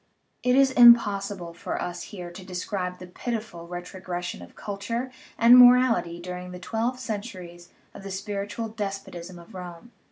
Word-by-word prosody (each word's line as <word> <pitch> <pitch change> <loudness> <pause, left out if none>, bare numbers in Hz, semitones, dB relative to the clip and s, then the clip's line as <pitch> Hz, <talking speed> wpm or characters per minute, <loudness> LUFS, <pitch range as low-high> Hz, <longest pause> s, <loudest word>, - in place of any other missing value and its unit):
It 250 0 +3
is 270 0 +5
impossible 205 -7 +5
for 170 - -4
us 175 - -4
here 180 -4 -8
to 180 +2 -10
describe 180 0 -4
the 180 - -10
pitiful 210 -3 -5
ret 175 0 -6
rogression 180 - -5
of 85 - -13
culture 230 +5 -4 0.3
and 235 +1 +8
morality 245 -8 +6
during 180 +1 -7
the 180 - -8
twelve 230 +6 -2
centuries 190 -7 -7 0.2
of - - -10
the 195 - -8
spiritual 200 +3 -4
despotism 195 -4 -6
of 170 0 -14
Rome. 180 +4 -9
195 Hz, 155 wpm, -26 LUFS, 180-230 Hz, 0.3 s, and